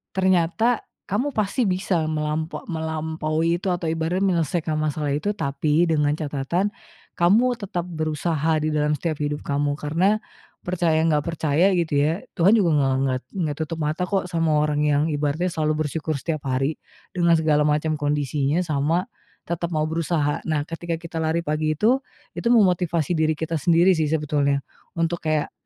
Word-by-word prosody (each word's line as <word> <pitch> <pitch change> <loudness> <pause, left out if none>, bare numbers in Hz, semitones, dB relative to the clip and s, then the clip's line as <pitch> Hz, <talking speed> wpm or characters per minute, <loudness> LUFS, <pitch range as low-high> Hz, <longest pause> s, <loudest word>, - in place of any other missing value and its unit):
Ternyata 190 +5 +2 0.2
kamu 220 +9 0
pasti 215 +4 0
bisa 185 0 0
melampo 155 +1 -3
melampaui 160 0 -1
itu - - -4
atau 175 -1 -2
ibaratnya 165 +4 0
menyelesaikan 170 -3 0
masalah 150 -1 -1
itu. 180 +8 0
Tapi 150 0 +1
dengan 150 -2 +2
catatan, 155 +6 -1 0.5
kamu 200 +8 +5
tetap 185 -4 -3
berusaha 155 -1 -1
di 155 - 0
dalam 150 0 +1
setiap 160 -2 -3
hidup 145 0 -2
kamu. 145 0 0
Karena 170 +8 +1 0.5
percaya 175 -3 +1
nggak 155 -2 +3
percaya 165 +2 +1
gitu 165 -3 -1
ya 160 - 0
Tuhan 195 +6 +4
juga 175 -7 +3
nge 140 -2 +3 0.2
nget 130 -1 -1
nggak 155 -5 -1
tutup 160 +1 -3
mata 155 +4 -2
kok 195 -2 0
sama 165 -3 +1
orang 150 0 +1
yang 150 -1 +2
ibaratnya 145 +4 -1
selalu 155 0 0
bersyukur 155 0 -2
setiap 155 +1 -3
hari 135 +4 0 0.4
dengan 170 -2 +3
segala 155 -2 +2
macam 150 +1 +1
kondisinya, 145 +2 0
sama 155 +3 +1 0.4
tetap 170 0 -2
mau 155 - +1
berusaha. 155 -2 0
Nah 150 -2 +1
ketika 165 +1 -4
kita 165 0 -6
lari 160 +1 0
pagi 155 +1 0
itu, 245 +8 +3 0.3
itu - - -3
memotivasi 180 - +3
diri 155 -1 +1
kita 160 -1 -2
sendiri 170 +4 +4
sih 160 -3 0
sebetulnya 145 -3 0 0.3
untuk 165 +1 0
kayak 155 -1 0
160 Hz, 160 wpm, -23 LUFS, 150-175 Hz, 0.5 s, kamu